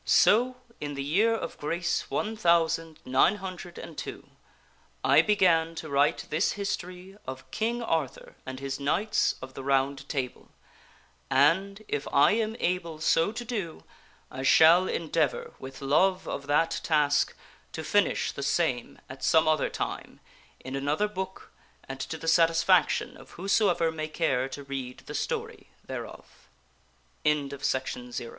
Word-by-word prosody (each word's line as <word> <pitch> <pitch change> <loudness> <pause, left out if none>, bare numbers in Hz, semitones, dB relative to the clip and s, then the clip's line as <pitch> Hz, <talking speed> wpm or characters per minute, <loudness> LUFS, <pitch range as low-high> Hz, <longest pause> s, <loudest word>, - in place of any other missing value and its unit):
So 245 +4 +4 0.2
in 145 -1 -5
the 140 - -3
year 205 +11 +2
of - - -6
grace 170 +4 -1
one 220 +1 -2
thousand 165 -4 +2
nine 130 +10 +4
hundred 185 -3 -8
and - - -9
two - - -7 0.8
I - - +6
began 170 -6 +3
to 160 -1 -6
write 140 +1 +2
this 155 - +1
history 190 -1 -5
of 130 0 -8
King 235 +2 -1
Arthur 160 - -2
and 130 0 -7
his 135 0 -4
Knights 175 +10 +1
of 130 0 -9
the 135 - -7
Round 135 0 0
Table 130 -4 -4 0.8
and, 190 +10 +2
if 145 0 -3
I 140 - +5
am 220 +1 0
able 170 -3 -1
so 165 +4 +2
to 240 +2 -6
do, 205 -9 -4 0.5
I 130 - -6
shall 165 +6 +6
endeavor, 160 -3 -1
with 135 0 -9
love 185 +7 +2
of 140 - -5
that 150 +3 +1
task, 145 -3 +2 0.4
to 160 - -5
finish 205 +6 +1
the - - -7
same 140 -4 -1
at 130 0 -10
some 160 -1 +4
other 155 -2 +2
time - - -5 0.4
in 130 +1 -7
another 145 +9 0
book 190 -2 -7 0.4
and 135 0 -7
to 160 +4 -4
the 165 - -8
satisfaction 165 0 +3
of - - -15
whosoever 180 -3 +2
may 155 -1 -4
care 135 -4 0
to 140 +1 -7
read 135 -2 -6
the - - -8
story - - -4 0.2
thereof. - - -9 0.7
Contents 135 -4 -1
160 Hz, 145 wpm, -28 LUFS, 140-185 Hz, 0.8 s, I